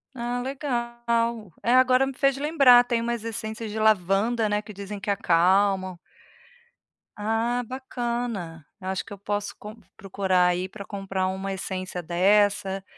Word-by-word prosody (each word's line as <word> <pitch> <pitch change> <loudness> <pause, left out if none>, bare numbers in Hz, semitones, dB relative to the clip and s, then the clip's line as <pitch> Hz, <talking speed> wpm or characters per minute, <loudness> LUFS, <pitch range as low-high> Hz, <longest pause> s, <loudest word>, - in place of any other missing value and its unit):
Ah 245 0 -3
legal. 235 - -2
É 240 - +2
agora 255 +1 +5
me 270 - -4
fez 275 +1 +1
lembrar 275 -5 +6
tem 240 -1 -1
umas 235 -1 -2
essências 225 -1 -5
de 220 - -4
lavanda, 215 +2 +2
né, 210 0 0
que 210 0 -11
dizem 200 +1 -7
que 205 - -6
acalmam. 190 0 +2 1.2
Ah 225 +3 -1
bacana, 235 - -4 0.2
eu 185 - -7
acho 190 0 -2
que - - -15
eu 200 - -9
posso 205 +1 -3
com 210 +1 -9 0.2
procurar 190 -2 +1
aí 180 +1 -1
pra 200 +1 -9
comprar 195 -2 -3
uma 190 +1 -4
essência 185 -1 -5
dessa, 195 +2 +2
210 Hz, 150 wpm, -25 LUFS, 190-235 Hz, 1.2 s, lembrar